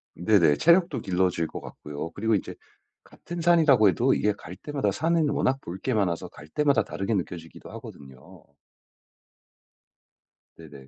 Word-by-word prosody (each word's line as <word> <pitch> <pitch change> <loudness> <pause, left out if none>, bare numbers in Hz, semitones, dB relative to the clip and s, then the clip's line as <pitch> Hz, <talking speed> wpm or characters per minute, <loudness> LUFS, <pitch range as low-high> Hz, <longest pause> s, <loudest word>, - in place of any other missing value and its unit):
네네. 85 -4 +3
체력도 170 +1 +3
길러질 90 -3 0
것 - - -8
같고요. 75 +2 -7
그리고 110 +4 0
인제 95 - -4 0.5
같은 175 0 -8
산이라고 155 - +5
해도 125 +8 +2
이게 105 - +1
갈 90 -3 -11
때마다 140 -4 -2
산은 160 - +1
워낙 135 -2 0
볼 85 +2 -7
게 130 - -1
많아서 95 -6 -1
갈 75 - -14
때마다 140 - +2
다르게 95 +3 -3
느껴지기도 85 -4 -5
하거든요. 65 -2 -12 2.1
네네. 70 -5 -13
100 Hz, 320 characters per minute, -26 LUFS, -, 2.1 s, 산이라고